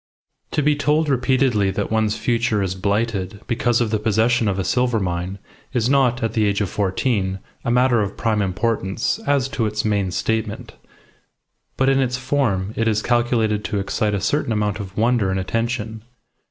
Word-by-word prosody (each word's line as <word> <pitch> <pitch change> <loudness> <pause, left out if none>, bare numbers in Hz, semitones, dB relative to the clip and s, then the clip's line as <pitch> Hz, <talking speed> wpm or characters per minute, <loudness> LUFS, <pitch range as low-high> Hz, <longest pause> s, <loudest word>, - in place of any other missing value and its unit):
To 150 - +1
be 150 +1 +3
told 150 +2 +1
repeatedly 125 -5 +2
that 100 +2 -3
one's 110 -1 +1
future 115 -4 0
is 95 -1 -1
blighted 100 0 -2
because 120 0 +1
of 115 -3 0
the 110 - +1
possession 110 +2 +2
of 95 -2 0
a 95 - 0
silver 125 +1 +1
mine 90 0 -3 0.4
is 120 0 +1
not, 125 -3 +2
at 110 -1 -1
the 110 -2 +2
age 100 -1 +1
of 100 -4 -1
fourteen, 95 -1 0 0.3
a - - -2
matter 125 -1 +3
of 100 -1 -3
prime 110 -2 +1
importance 100 - -1
as 140 -2 +2
to 115 -5 -1
its 105 +1 -2
main 100 -3 +1
statement; 110 +3 -2 1.0
but 130 - +2
in 135 0 +4
its 125 -1 0
form 125 -7 0
it 115 - 0
is 105 -1 +1
calculated 120 -3 +1
to 105 - -2
excite 105 +1 -1
a - - 0
certain 145 +2 0
amount 105 -1 0
of 95 -2 -8
wonder 115 -2 +2
and 95 0 0
attention. 115 +2 -2
110 Hz, 180 wpm, -21 LUFS, 100-120 Hz, 1.0 s, in